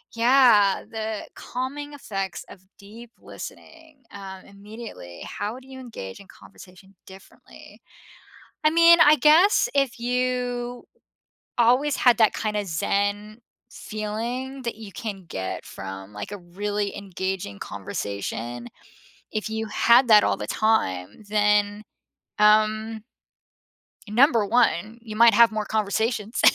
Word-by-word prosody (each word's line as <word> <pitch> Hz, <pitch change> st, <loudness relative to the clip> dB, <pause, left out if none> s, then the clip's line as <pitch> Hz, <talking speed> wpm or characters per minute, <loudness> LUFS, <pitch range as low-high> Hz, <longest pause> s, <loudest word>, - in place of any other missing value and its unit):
Yeah, 230 Hz, -5 st, +4 dB
the 220 Hz, -1 st, -5 dB
calming 280 Hz, +4 st, -6 dB
effects 195 Hz, -9 st, -5 dB
of 190 Hz, -, -13 dB, 0.2 s
deep 225 Hz, +4 st, -13 dB
listening, 320 Hz, -4 st, -12 dB
um, 190 Hz, -1 st, -10 dB
immediately. 200 Hz, -, -11 dB
How 215 Hz, +5 st, -5 dB
do 265 Hz, -, -19 dB
you 265 Hz, 0 st, -10 dB
engage 160 Hz, -, -9 dB
in 200 Hz, -, -15 dB
conversation 190 Hz, +1 st, -16 dB
differently? 190 Hz, 0 st, -16 dB, 0.9 s
I -, -, +7 dB
mean, 335 Hz, +1 st, +7 dB
I 305 Hz, -1 st, +7 dB
guess 325 Hz, -, +5 dB
if 275 Hz, -4 st, +1 dB
you 245 Hz, 0 st, -2 dB, 0.7 s
always 250 Hz, +5 st, +3 dB
had 245 Hz, -2 st, +4 dB
that 220 Hz, -2 st, +4 dB
kinda 210 Hz, -2 st, -2 dB
zen 205 Hz, +5 st, -2 dB, 0.3 s
feeling 235 Hz, +6 st, -5 dB
that 235 Hz, -, -3 dB
you 215 Hz, -3 st, -10 dB
can 200 Hz, -5 st, -6 dB
get 95 Hz, -, -5 dB
from, 95 Hz, +1 st, -9 dB
like, 105 Hz, -, -7 dB
a 205 Hz, -, -6 dB
really 205 Hz, +3 st, -4 dB
engaging 190 Hz, -, -5 dB
conversation, 100 Hz, +4 st, -5 dB, 0.7 s
if 215 Hz, 0 st, -3 dB
you 220 Hz, 0 st, -3 dB
had 235 Hz, +4 st, +4 dB
that 210 Hz, -1 st, +8 dB
all -, -, +1 dB
the -, -, -5 dB
time, 155 Hz, -, -1 dB
then, 210 Hz, 0 st, +2 dB, 0.6 s
um 215 Hz, +1 st, +3 dB, 1.1 s
Number 235 Hz, -1 st, +4 dB
1, 225 Hz, -1 st, +1 dB
you 215 Hz, -2 st, -9 dB
might 230 Hz, 0 st, +6 dB
have 235 Hz, -1 st, +6 dB
more 215 Hz, -1 st, -3 dB
conversations. 220 Hz, +1 st, -1 dB
215 Hz, 120 wpm, -24 LUFS, 200-245 Hz, 1.1 s, that